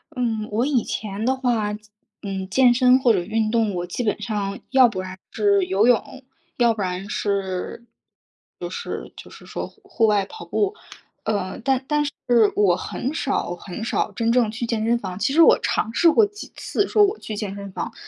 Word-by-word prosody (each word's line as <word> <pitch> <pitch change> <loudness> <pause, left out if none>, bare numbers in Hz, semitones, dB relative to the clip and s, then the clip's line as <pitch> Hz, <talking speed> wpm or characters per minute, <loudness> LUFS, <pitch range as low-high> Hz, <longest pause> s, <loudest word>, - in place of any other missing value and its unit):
嗯， 225 -4 -1
我 230 +5 +1
以 265 -6 +1
前 210 0 -4
的 260 +2 +2
话， 235 -5 0
健 210 - -8 0.4
嗯， 195 -1 -4
健 250 +3 +5
身 250 +1 +5
或 245 -3 +4
者 190 - +2
运 220 +2 -1
动， 225 -4 +1
我 175 0 -2
基 210 +7 -4
本 210 - 0
上， 200 -3 -3
要 260 -2 +7
不 190 -5 -4
然 185 0 -8
是 200 -2 +2
游 195 +4 +2
泳， 250 +2 +1 0.3
要 235 -2 +4
不 215 - -5
然 185 +2 -3
是 200 +3 -3 0.7
就 - - -5
是 470 - -6
就 - - -11
是 - - -14
说 - - -5
户 - - -23
户 225 -2 +1
外 205 -2 +2
跑 435 - -10
步， 410 0 0 0.5
呃， 200 -4 -2
但 265 +1 0
但 295 -1 +1
是 290 - -3 0.4
我 190 -4 +4
很 255 +9 -4
少 265 - -1
很 180 +4 -8
少 235 - -1
真 230 -1 0
正 240 -3 +3
去 225 +2 -4
健 225 -2 -1
身 235 +1 +3
房， 190 -3 -6
其 270 - 0
实 330 - +5
我 - - +7
尝 225 - -1
试 335 +7 +5
过 430 +6 +5
几 415 +1 -10
次 410 - -1
说 420 - +4
我 410 +2 +1
去 215 - -6
健 205 -2 -4
身 200 -1 -8
房， - - -5
220 Hz, 220 characters per minute, -22 LUFS, 200-255 Hz, 0.7 s, 要